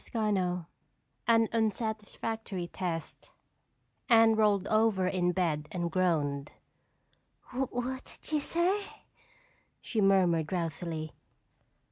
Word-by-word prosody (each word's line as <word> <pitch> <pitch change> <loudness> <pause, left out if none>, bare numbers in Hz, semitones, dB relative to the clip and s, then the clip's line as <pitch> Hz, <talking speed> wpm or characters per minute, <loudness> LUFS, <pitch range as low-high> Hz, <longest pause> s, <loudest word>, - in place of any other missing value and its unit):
CHAPTER 190 -6 0
X - - -24 0.6
An 230 -1 +5
Unsatisfactory 220 -2 -2
Test 170 -2 -5 0.8
Anne 225 -1 +6
rolled 205 -3 +3
over 215 -3 +2
in 180 -1 +1
bed 160 -5 0
and 175 -2 -2
groaned. 150 -6 0 1.0
"What 260 0 -3
did - - -10
you 305 - +2
say?" 350 +7 +1 1.0
she 220 - -2
murmured 180 -5 +4
drowsily. 165 -2 -3
195 Hz, 95 wpm, -30 LUFS, 175-225 Hz, 1.0 s, Anne